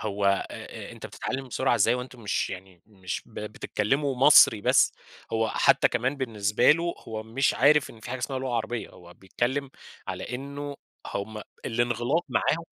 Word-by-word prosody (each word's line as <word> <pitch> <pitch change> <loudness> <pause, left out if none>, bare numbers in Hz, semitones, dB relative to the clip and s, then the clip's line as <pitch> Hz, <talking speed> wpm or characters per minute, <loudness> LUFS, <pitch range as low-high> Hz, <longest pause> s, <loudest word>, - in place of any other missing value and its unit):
هو 105 -2 -3
آآ، 100 0 -2
أ - - -10
أنت - - -8
بتتعلم 130 0 -5
بسرعة 130 +1 +1
إزاي 115 +2 +3
هو - - -2
وأنتم 125 -1 -8
مش 105 - -1
يعني 95 -2 -10
مش 95 -4 -6
ب 115 - -20
بتتكلموا 110 +6 -1
مصري 130 -5 +7
بس، - - +4 0.4
هو 115 0 +1
حتى - - +4
كمان 125 +4 -1
بالنسبة 105 -6 +2
له 170 +2 +1
هو 110 -1 -4
مش 120 +5 +1
عارف 145 +1 +4
إن 115 - -15
في - - -8
حاجة 130 - -3
اسمها 130 +2 -3
لغة 130 -2 -3
عربية، 115 0 -2
هو 90 0 -15
بيتكلم 130 +8 -2 0.4
على 125 - -4
إنه 140 +2 -6 0.4
هُم 105 +2 -4 0.3
الانغلاق 120 +7 0
معاهم 165 +2 0
120 Hz, 175 wpm, -27 LUFS, 105-135 Hz, 0.4 s, مصري